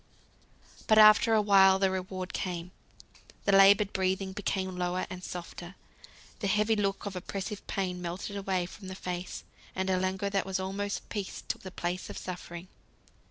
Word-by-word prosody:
But 215 - +5
after 215 +1 +7
awhile 195 -2 +6
the 190 -1 +2
reward 185 0 -4
came. 180 -1 -4 0.7
The 200 - +3
laboured 195 +1 +6
breathing 190 0 0
became 190 -2 -2
lower 180 0 -1
and 180 0 -7
softer, 175 +1 -7 0.6
the 200 - -1
heavy 210 +3 +2
look 200 -1 -1
of 200 -2 -5
oppressive 195 +2 -5
pain 180 -2 -2
melted 180 +4 -5
away 190 -2 -1
from 190 +2 -11
the 190 - -6
face, 180 -1 -5 0.3
and 190 0 0
a 185 - +2
languor 190 +2 -1
that 195 -1 +1
was 190 0 -1
almost 200 +2 -3
peace 205 -3 -5
took - - -3
the 190 - -7
place 180 0 -4
of - - -7
suffering. 175 -1 -7
190 Hz, 160 wpm, -30 LUFS, 185-200 Hz, 0.7 s, after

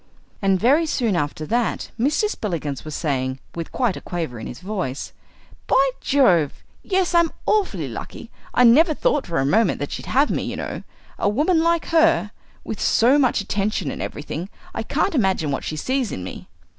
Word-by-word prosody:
And 195 -2 +2
very 285 - +4
soon 235 -9 0
after 150 0 -2
that 235 +5 -1
Mr. 295 - +2
Spillikins 165 - -4
was 155 -1 -6
saying, 130 -4 -1 0.2
with 165 -1 -6
quite 245 -7 0
a - - -7
quaver 160 -10 -4
in 110 - -6
his 120 - -8
voice, 180 -8 -4 0.5
"By 270 0 +4
Jove! 180 - +2 0.2
yes, 375 -2 0
I'm 340 -1 +4 0.2
awfully 425 -2 +1
lucky; - - -8 0.2
I 250 - +4
never 300 +7 +6
thought 285 - +1
for 170 - -2
a 135 - +2
moment 205 +6 +3
that 145 - -4
she'd - - -6
have 280 +3 +3
me, - - 0
you - - -4
know - - -5 0.4
a - - +2
woman 315 - +2
like 335 0 +2
her, 330 -9 +3 0.3
with 220 - -5
so 255 +6 +4
much 255 -6 +2
attention 200 -6 -1
and - - -6
everything. 155 +5 -5 0.2
I - - -3
can't 395 - 0
imagine 190 - +1
what 135 - -2
she 155 - -4
sees 255 - -1
in 90 - -5
me." 90 - -8
210 Hz, 185 wpm, -22 LUFS, -, 0.5 s, never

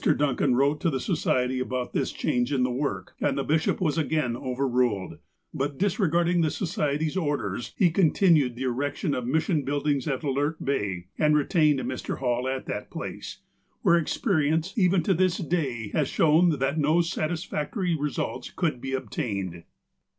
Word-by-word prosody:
Duncan 135 -2 +2
wrote 140 +3 +2
to 170 - +2
the 135 -4 -1
Society 125 0 0
about 130 -1 -3
this - - 0
change 125 +2 -1
in 135 -3 +2
the 125 - +1
work, 125 -7 -3
and - - +1
the - - 0
bishop 155 +1 +1
was 165 -2 +1
again 150 -6 0
overruled. 125 -6 -1 0.3
But, 140 +1 -2
dis 200 +1 0
regarding 175 -1 +2
the 160 - +2
Society's 150 -2 -1
orders, 140 - -2
he 180 -5 +4
continued 160 -6 +3
the 125 - -5
erection 140 +5 -1
of 125 -1 -3
mission 160 +2 +1
buildings 145 -1 -1
at 135 -1 -2
Alert 145 +3 -1
Bay, 100 -10 -1
and 150 0 +4
retained 150 -2 +3
Mr. 130 - -4
Hall 125 -1 -1
at 130 0 -3
a - - -4
place, - - -7 0.4
where 170 - +5
experience, 160 - 0
even 185 -4 +3
to 190 - +2
this 185 0 +2
day, 145 - -2
has 150 +3 0
shown 165 +3 +4
that 140 +4 0
no 155 +3 +3
satisfactory 170 +1 -2
results 145 -4 -3
could 155 -9 -2
be 135 0 -4
obtained. 100 - -3
145 Hz, 165 wpm, -26 LUFS, 130-165 Hz, 0.4 s, where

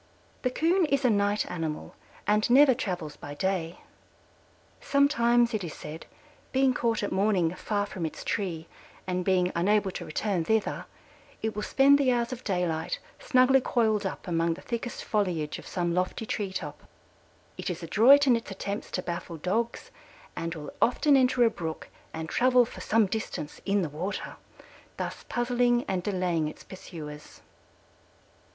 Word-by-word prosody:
The 255 - +1
Coon 335 +6 +2
is 280 -2 +1
a 245 - +5
night 205 0 +1
animal 160 -3 -4 0.3
and 210 +2 +2
never 265 +2 +7
travels 180 - -4
by 145 0 -8
day; 180 -1 -2 1.0
sometimes 240 -4 +3
it 215 -3 -1
is 165 - -6
said, 155 +2 -9 0.4
being 265 0 +3
caught 230 -3 0
at - - -2
morning 190 -4 +2
far 205 +2 -1
from 185 -3 -6
its - - -8
tree 175 -6 -2 0.4
and 180 -1 -1
being 180 -1 +2
unable 200 +3 +2
to - - -6
return 180 +2 -1
thither, 220 +5 0 0.6
it 220 0 -1
will 210 - -2
spend 275 +5 +5
the 265 -2 +3
hours 240 0 0
of 255 - -8
daylight 180 -5 -1 0.2
snugly 260 0 +4
coiled 220 -4 +1
up 190 - -5
among 165 -1 +1
the - - -12
thickest 235 0 -4
foliage 180 -8 -1
of - - -12
some 175 -2 -1
lofty 180 +5 -1
tree 205 -2 -3
top. 150 -6 -6 0.7
It - - -4
is 175 -1 -5
adroit 255 - +6
in 255 -3 +5
its 230 - -4
attempts 200 +1 -5
to 185 - -2
baffle 170 -1 -5
Dogs, 220 +9 -2 0.4
and 165 0 -3
will 150 -2 -8
often 280 +4 +4
enter 255 -2 +4
a 230 - +4
brook 160 -5 -6 0.2
and 160 0 -5
travel 250 +5 +4
for - - -10
some 225 0 +3
distance 190 -7 -5
in 200 -1 +2
the - - -1
water, 180 +7 -5 0.6
thus - - -5
puzzling 240 0 +1
and 185 -2 -1
delaying 180 -5 0
its 155 - -9
pursuers. 150 -5 -10
205 Hz, 160 wpm, -28 LUFS, 175-240 Hz, 1.0 s, never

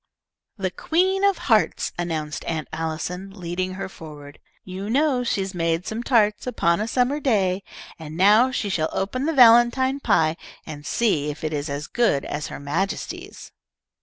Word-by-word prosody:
"The 190 -2 -2
Queen 375 - 0
of 400 -3 +3
Hearts," 220 -4 +1
announced 160 -4 -3
Aunt 160 -2 -3
Allison, 165 +4 -4
leading 185 +2 -3
her 195 0 -4
forward. 150 -5 -12 0.2
"You 190 +2 -6
know 270 0 +2
'she 200 -5 -1
made 165 0 -1
some 220 +2 -4
tarts, 215 -3 +2
upon 170 -7 +1
a 215 - -2
summer 255 +5 +1
day,' 200 -9 +1 0.4
and 160 0 -8
now 210 +7 +5
she 250 -4 -2
shall 160 -5 0
open 255 +9 -2
the - - +2
valentine 245 +2 +5
pie 160 - +2 0.3
and 145 -2 -8
see 160 -11 +1
if 150 +2 -7
it 155 0 -2
is 145 0 -3
as 145 +1 -4
good 230 - +1
as 145 0 -4
her - - -8
Majesty's." 165 +8 -4
190 Hz, 165 wpm, -23 LUFS, 160-240 Hz, 0.4 s, now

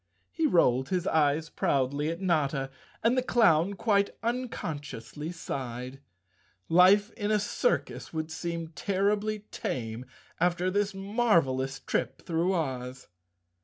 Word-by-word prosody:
He 325 -2 +1
rolled 130 - +3
his 180 -1 0
eyes 155 0 +2
proudly 140 +3 0
at 165 +1 -4
Notta, 150 -7 0 0.3
and 235 +2 +4
the 255 - +3
clown 200 -7 +3
quite 200 -1 +1
uncon¬ 245 +2 -1 0.3
sciously 150 +3 -7
sighed. 130 -5 -5 0.7
Life 195 +5 +5
in 205 -2 -3
a 215 - +4
circus 210 - -1
would 160 0 -4
seem 170 -1 -4
terribly 205 +4 -1
tame 125 - -4 0.3
after 180 +1 +1
this 205 0 0
marvelous 170 - +1
trip 130 - -2
through 170 +2 +1
Oz. 130 -7 -3
170 Hz, 125 wpm, -29 LUFS, 140-205 Hz, 0.7 s, Life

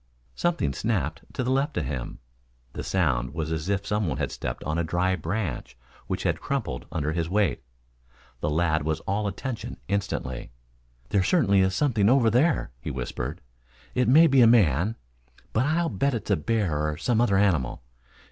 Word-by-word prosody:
Something 165 - 0
snapped 80 - -2
to 130 - -1
the 125 - 0
left 140 +3 0
of 85 - 0
him. 65 -3 -4 0.6
The - - -5
sound 65 -8 0
was 80 -1 -2
as 80 +3 -2
if 100 0 0
some 105 -2 0
one 70 -4 -2
had 70 -3 -2
stepped - - -5
on 80 +2 -1
a - - +1
dry 90 +3 +1
branch 80 - -4 0.3
which - - -2
had - - 0
crumpled 65 - -3
under 75 -1 -1
his 80 0 -2
weight. 100 -3 +1 0.8
The 75 - -1
lad 80 0 +1
was 80 +1 -1
all 100 +2 -1
attention 115 +5 -5
instantly. 65 -11 -3 0.6
"There 100 - +2
certainly 100 - +3
is 95 0 +2
something 115 -8 +2
over 125 -3 +4
there," 130 - +2
he 70 - -5
whispered. 65 +4 -4 0.5
"It 125 -2 +1
may 155 +7 +7
be 135 -5 +5
a 115 - +8
man, 100 - +4 0.6
but 125 +5 +2
I'll 165 +2 +1
bet 125 +7 0
it's 110 - -4
a - - +5
bear 95 0 0
or 75 - -4
some 115 +5 +1
other 100 -5 +3
animal. 80 -13 +1
95 Hz, 180 wpm, -26 LUFS, 75-115 Hz, 0.8 s, a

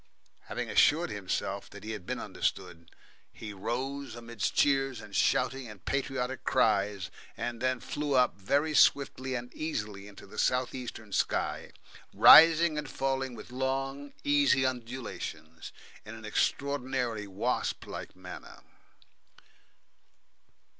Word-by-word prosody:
And - - -29
having - - -4
assured 165 +3 +3
himself 100 0 -3
that 100 - -12
he 110 - -5
had 105 -5 -7
been - - -2
understood, 85 0 -3 0.4
he 105 - -8
rose 130 +6 -4
amidst 120 -2 -3
cheers 135 -3 +2
and 105 -2 -10
shouting 130 0 +1
and 105 -3 -13
patriotic 130 -2 -2
cries, 100 -1 +1 0.3
and 120 -1 -4
then 130 0 +1
flew 145 +3 -2
up 125 -1 +3
very 140 +11 0
swiftly 130 -3 +3
and 125 0 -6
easily 105 -10 -4
into 100 - -13
the 95 - -9
south 125 -1 +1
eastern 110 -5 -7
sky, - - -1 0.5
rising 165 -1 +8
and 145 -2 -6
falling 135 -1 -2
with 120 - -11
long, 135 +2 -3
easy 145 -2 +3
undulations 115 -11 -5 0.3
in 105 - -9
an 110 -1 -10
extraordinarily 125 -2 -1
wasp 105 +6 -2
like - - -8
manner. 90 0 -11
125 Hz, 125 wpm, -30 LUFS, 105-135 Hz, 0.5 s, rising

